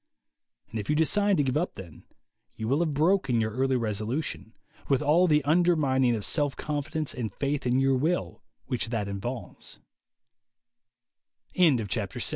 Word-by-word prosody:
And 115 - -3
if 105 - -6
you 150 - +2
decide 200 +5 +2
to 145 - +3
give 130 -2 -1
up 175 +4 -2
then, 90 -5 -11 0.5
you 110 - -4
will 135 +5 +2
have 160 -4 0
broken 150 -6 +2
your 110 0 0
early 130 +3 0
resolution, 110 +2 -3 0.3
with 135 -3 +2
all 170 +5 +4
the 150 -3 +3
undermining 145 -6 +3
of 105 - -4
self 145 -3 0
con 150 -1 -2
fidence 155 0 -3
and 115 -4 -3
faith 140 +3 -2
in 125 +1 +2
your 135 0 +3
will 135 - -1 0.2
which 120 -2 -2
tha 115 -3 -1
135 Hz, 145 wpm, -27 LUFS, 120-155 Hz, 0.5 s, all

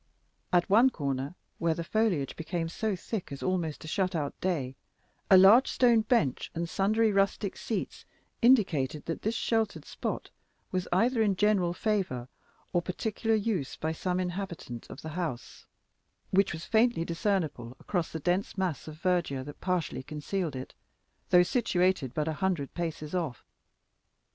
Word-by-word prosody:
At 175 -1 +3
one 225 +6 +6
corner, 140 - -3 0.2
where 165 -1 +1
the 170 - -3
foliage 180 - 0
became 165 0 -3
so 215 +4 -1
thick 190 0 -5
as 140 - -6
almost 175 -5 -1
to - - -9
shut 185 +2 0
out 145 -3 -1
day, 145 -9 -1 0.5
a 190 - +9
large 205 +8 +8
stone 240 -3 +4
bench 215 - +1
and 170 +1 -2
sundry 215 +5 +2
rustic 195 0 +1
seats 220 - -4 0.4
indicated 175 - +3
that 165 - -3
this 220 +2 -1
sheltered 225 -2 0
spot - - -4 0.4
was 185 -1 -1
either 230 +6 +3
in 205 -3 +3
general 200 -3 +2
favor 180 - -1 0.4
or 175 - +3
particular 220 +5 -1
use 200 -10 -1
by 160 - -2
some 180 +3 -1
inhabitant 175 - -5
of 135 - -10
the 160 - -5
house, 155 -7 -5 0.6
which 195 +1 +3
was 160 +2 -6
faintly 225 -6 +3
discernible 165 - -1
through 180 -4 +1
the 160 0 -6
dense 180 +6 -1
mass 185 -6 -2
of 155 0 -9
verdure 175 -8 0
that 145 +2 -10
partially 180 -7 -1
concealed 155 +3 -3
it, 130 0 -7 0.6
though 180 0 +7
situated 180 - +1
but 150 0 0
a 160 - 0
hundred 175 -5 -1
paces 160 -2 -4
off. 165 -9 -3
180 Hz, 155 wpm, -29 LUFS, 155-200 Hz, 0.6 s, a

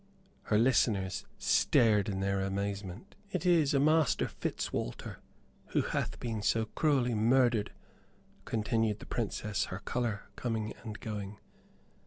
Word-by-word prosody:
Her 105 - +2
listeners 105 -6 +2
stared 105 -3 +3
in 95 -1 -2
their 100 0 0
amazement. 100 - -4 0.2
"It 185 0 -2
is 165 -6 +4
a - - +4
Master 155 0 +3
Fitzwalter - - -4 0.5
who - - +1
hath - - -2
been 115 -3 -3
so 110 +2 +2
cruelly 130 -1 +1
murdered," 115 -1 +3 0.7
continued 110 -1 0
the - - -11
Princess, 105 -2 -2
her 95 - -5
color 110 0 -2
coming 110 -3 -2
and 110 -2 -6
going. 105 -2 -5
110 Hz, 125 wpm, -31 LUFS, 100-125 Hz, 0.7 s, is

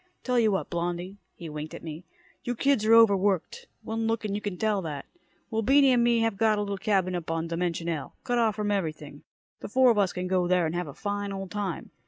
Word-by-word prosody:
Tell 250 -1 +1
you 220 -2 +3
what, 190 - -2
Blondie." 175 +3 -3 0.2
He 170 - -8
winked 150 0 -6
at - - -10
me. 160 +2 -7 0.4
"You 245 - -2
kids 275 -2 +2
are 225 - +6
over 225 -3 +7
worked. 190 -2 -1 0.2
One 225 0 -2
look 225 0 -1
and 205 - -2
you 205 - -2
can 205 -3 -4
tell 215 -1 +1
that. 150 -5 -5 0.5
Well, 225 0 0
Beany 270 +3 +5
and 245 -1 +4
me 235 -1 +3
have 225 -3 0
got 220 0 +3
a - - 0
little 200 -1 -3
cabin 190 -3 +1
up 175 -2 -4
on 165 0 -1
Dimension 170 0 -2
L, 160 -5 -4
cut 245 0 0
off 220 -3 +2
from 210 -1 -1
everything. 155 -7 -3 0.4
The - - -7
four 255 +2 +5
of 215 - +1
us 195 -3 +2
can 180 0 -4
go 180 -1 +1
there 180 -1 +3
and 160 - -2
have 175 -1 -2
a 140 - -9
fine 205 -1 -3
old 195 -1 -6
time. 200 -5 -4
200 Hz, 250 wpm, -27 LUFS, 175-220 Hz, 0.5 s, over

